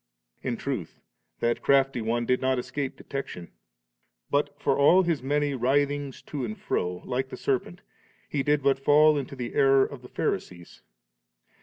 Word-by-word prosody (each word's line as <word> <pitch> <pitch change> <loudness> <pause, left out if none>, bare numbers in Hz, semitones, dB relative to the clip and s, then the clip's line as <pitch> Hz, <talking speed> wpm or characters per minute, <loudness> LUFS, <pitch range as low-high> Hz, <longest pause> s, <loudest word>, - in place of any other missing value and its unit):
In 120 -3 -2
truth, 125 - -4 0.4
that 120 0 +1
crafty 135 -3 +3
one 120 +2 -1
did 125 +1 +1
not 130 0 +1
escape 135 +2 -4
detection; 135 -11 -6 0.8
but, 145 0 0
for 140 - +1
all 175 +7 +5
his 170 -4 0
many 145 +2 0
writhings 140 +2 0
to 145 -4 -5
and 110 -2 -4
fro, 90 0 -2
like 130 +1 -2
the - - -7
serpent, 140 +6 -2 0.5
he 145 - -1
did 145 0 +1
but 135 -1 +3
fall 150 +2 +5
into 140 -1 -4
the 120 -2 -5
error 135 -1 +5
of 140 -3 -9
the 125 - -13
Pharisees. 85 -1 -4
135 Hz, 160 wpm, -27 LUFS, 125-145 Hz, 0.8 s, all